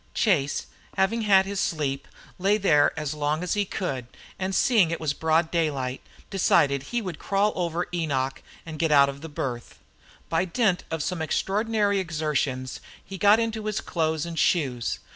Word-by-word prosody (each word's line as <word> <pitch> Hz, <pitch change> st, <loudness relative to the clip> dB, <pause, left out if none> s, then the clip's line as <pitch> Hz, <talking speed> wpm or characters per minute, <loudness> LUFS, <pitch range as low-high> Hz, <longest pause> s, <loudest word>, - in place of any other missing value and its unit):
Chase, 150 Hz, -10 st, +1 dB, 0.3 s
having 195 Hz, +5 st, +2 dB
had 195 Hz, -3 st, +5 dB
his 200 Hz, 0 st, -3 dB
sleep, 140 Hz, -6 st, -1 dB, 0.3 s
lay 200 Hz, +3 st, +3 dB
there 155 Hz, -8 st, +4 dB
as 150 Hz, -1 st, -3 dB
long 150 Hz, +2 st, -1 dB
as 180 Hz, -, -1 dB
he 205 Hz, -1 st, +1 dB
could, 135 Hz, -11 st, -4 dB, 0.3 s
and 190 Hz, 0 st, -2 dB
seeing 220 Hz, -10 st, +4 dB
it 170 Hz, -, -3 dB
was 150 Hz, -3 st, -1 dB
broad 160 Hz, +2 st, +1 dB
daylight, 140 Hz, -6 st, -1 dB, 0.3 s
decided 140 Hz, -7 st, +3 dB
he 235 Hz, -, -3 dB
would 180 Hz, -6 st, -6 dB
crawl 200 Hz, +1 st, +1 dB
over 175 Hz, -1 st, -1 dB
Enoch 140 Hz, -6 st, -1 dB, 0.2 s
and 160 Hz, -2 st, -8 dB
get 165 Hz, -2 st, +1 dB
out 140 Hz, -1 st, +6 dB
of 140 Hz, 0 st, -8 dB
the 160 Hz, -, -7 dB
berth. 125 Hz, -5 st, -5 dB, 0.5 s
By 165 Hz, +1 st, +1 dB
dint 190 Hz, 0 st, +1 dB
of 160 Hz, -2 st, -2 dB
some 180 Hz, -3 st, -3 dB
extraordinary 205 Hz, +4 st, 0 dB
exertions 150 Hz, -6 st, -2 dB, 0.3 s
he 190 Hz, 0 st, -8 dB
got 205 Hz, +2 st, +6 dB
into 225 Hz, -2 st, -2 dB
his 215 Hz, -, -1 dB
clothes 160 Hz, -2 st, -1 dB
and 170 Hz, -1 st, -4 dB
shoes. 125 Hz, -, +1 dB
165 Hz, 170 wpm, -25 LUFS, 145-195 Hz, 0.5 s, out